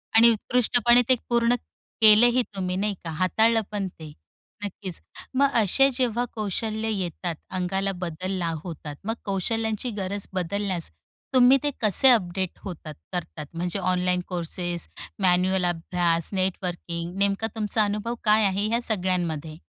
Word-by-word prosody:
आणि 230 +1 +8
उत्कृष्टपणे 240 +1 +3
ते 255 - +6
पूर्ण 235 0 +3 0.5
केलेही 235 +4 +7
तुम्ही, 185 -1 -2
नाही 205 +2 0
का? 165 - -5
हाताळलं 220 +7 +2
पण 200 -2 -2
ते, 160 -4 -11 0.5
नक्कीच. 190 -3 -3 0.3
मग 280 +1 +4
असे 270 +8 +4
जेव्हा 245 -2 +1
कौशल्य 220 +1 -2
येतात, 180 -4 -3
अंगाला 190 +1 -1
बदलला 180 +1 -3
होतात, 150 -4 -7
मग 225 - 0
कौशल्यांची 220 +4 -1
गरज 195 +1 -1
बदलण्यास 185 -1 -1 0.4
तुम्ही 255 +1 +6
ते 295 - +2
कसे 220 +5 +6
अपडेट 190 -5 +1
होतात 165 -5 -7 0.2
करतात, 165 -3 -5
म्हणजे 175 +3 -2
ऑनलाईन 180 -1 +1
कोर्सेस, 175 -1 -2 0.3
मॅन्युअल 185 0 +3
अभ्यास, 170 -1 0
नेटवर्किंग, 180 -2 -3
नेमका 200 +2 +1
तुमचा 215 0 +1
अनुभव 210 +3 -2
काय 215 0 +4
आहे 200 +2 0
ह्या 235 +2 0
सगळ्यांमध्ये? 175 -7 -1
190 Hz, 130 wpm, -25 LUFS, 180-220 Hz, 0.5 s, आणि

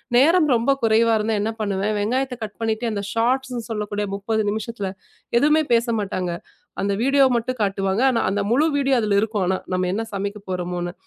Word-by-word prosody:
நேரம் 315 +7 +5
ரொம்ப 235 +4 +2
குறைவா 225 0 +3
இருந்தா 215 +1 -1
என்ன 220 +2 -1
பண்ணுவேன், 205 0 -1
வெங்காயத்தை 250 +5 -1
கட் 210 -1 -7
பண்ணிட்டு 225 +1 -1
அந்த 205 -2 -2
ஷார்ட்ஸ்ன்னு 250 +1 0
சொல்லக்கூடிய 210 -1 -2
30 220 +2 -1
நிமிஷத்துல 215 -1 -3 0.5
எதுவுமே 300 +5 +4
பேசமாட்டாங்க. 215 -6 0 0.5
அந்த 200 +1 0
வீடியோ 275 +2 +4
மட்டும் 240 +1 -2
காட்டுவாங்க. 195 +1 0
ஆனா 235 -3 +1
அந்த 200 +2 0
முழு 275 +6 +4
வீடியோ 275 -1 +2
அதுல 210 -2 +1
இருக்கும் 215 -2 -1
ஆனா. 190 +1 +1 0.2
நம்ம 185 0 0
என்ன 220 +3 -1
சமைக்கப்போறமோன்னு. 185 -3 -4
220 Hz, 165 wpm, -22 LUFS, 200-240 Hz, 0.5 s, நேரம்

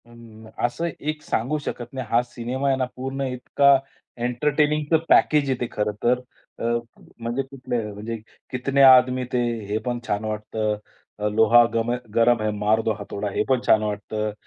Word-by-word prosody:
अ, 120 - -19 0.5
असं 165 +8 -2
एक 155 +1 -3
सांगू 130 +7 -1
शकत 120 +1 -5
नाही. 130 -3 -5
हा 115 +1 +4
सिनेमा 125 +3 -4
आहे 135 -1 +2
ना 130 - 0
पूर्ण 135 +2 -4
इतका 140 +2 +4 0.4
एंटरटेनिंगचं 150 +5 +1
पॅकेज 150 -3 +4
आहे 130 -2 0
ते 120 - 0
खरं 105 0 -1
तर. 125 +1 +3 0.4
अ, - - -5 0.6
म्हणजे 120 +3 -2
कुठले, 130 -3 -4
म्हणजे 110 +3 -5 0.3
"कितने 135 +2 +1
आदमी 130 -1 +6
थे?" 125 - +2 0.3
हे 105 +2 -1
पण 120 -1 -2
छान 105 0 -1
वाटतं. 110 0 -2 0.4
अ, 105 - 0
"लोहा 110 +3 +6
गम 115 +1 0
है 120 - 0 0.2
गरम 115 0 +4
है, 110 - 0
मार 105 +2 +2
दो 110 - 0
हथोडा". 100 0 -4
हे - - 0
पण 130 -2 +3
छान 110 -1 +5
वाटतं. 105 +1 -3
120 Hz, 175 wpm, -23 LUFS, 110-135 Hz, 0.6 s, आदमी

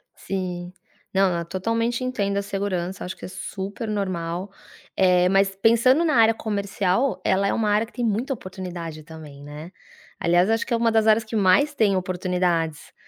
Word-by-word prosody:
Sim, 180 -2 -4 0.4
não, 190 -2 +3
eu 170 - -4
totalmente 230 +7 -1
entendo 200 -6 -1
a - - +2
insegurança. 195 -2 -3
Acho 180 - -5
que - - -9
é - - -6
super 195 +3 -6
normal, 185 -2 -3 0.4
eh, 180 -1 +4
mas 195 0 +2
pensando 245 +7 +4
na 310 - +2
área 225 -1 +6
comercial, 205 +2 -1
ela 195 +1 +2
é - - +1
uma 220 -2 0
área 210 +2 +2
que 230 - -21
tem 245 - -2
muita 230 +5 0
oportunidade 180 -7 -7
também, 150 -3 -11
né. 150 +4 -9 0.5
Aliás, 175 +4 +3
acho 225 0 +1
que 240 - -3
é - - +3
uma 230 0 +2
das 220 0 +2
áreas 220 +1 +5
que 220 +1 -6
mais 210 +10 +4
tem 210 -6 +2
oportunidades 180 -3 -1
195 Hz, 180 wpm, -23 LUFS, 180-225 Hz, 0.5 s, área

